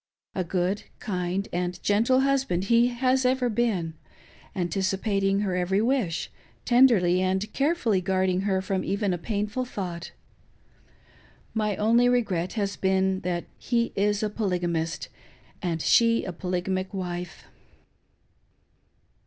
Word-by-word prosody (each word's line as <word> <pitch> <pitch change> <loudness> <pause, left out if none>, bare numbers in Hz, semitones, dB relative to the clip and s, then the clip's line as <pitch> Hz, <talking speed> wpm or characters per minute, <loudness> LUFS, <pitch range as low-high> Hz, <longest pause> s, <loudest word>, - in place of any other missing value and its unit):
A 185 - -1
good, 180 +3 -1
kind, 185 0 -2
and 180 0 -2
gentle 230 +6 +3
husband 270 -10 +1
he 235 +1 +5
has 255 +2 +1
ever 250 -1 +2
been, 210 -8 0 0.6
anticipating 195 +2 0
her 190 -3 -1
every 180 +2 +1
wish, 225 -7 0 0.3
tenderly 220 -8 +5
and 190 +3 -1
carefully 275 - +1
guarding 185 0 +1
her 190 -1 0
from 190 0 -1
even 200 -1 0
a 175 - -3
painful 210 +5 -2
thought. 180 -8 -5 1.4
My 215 -2 0
only 235 +4 +3
regret 200 -8 0
has 200 -3 -2
been 190 0 +1
that 175 -1 -3
he 235 -1 0
is 205 +1 +1
a 215 - +1
polygamist, 175 -6 -2 0.5
and 170 -4 -2
she 230 -1 +4
a 185 - -5
polygamic 185 +2 -2
wife. 175 -3 -5
195 Hz, 120 wpm, -26 LUFS, 180-230 Hz, 1.4 s, he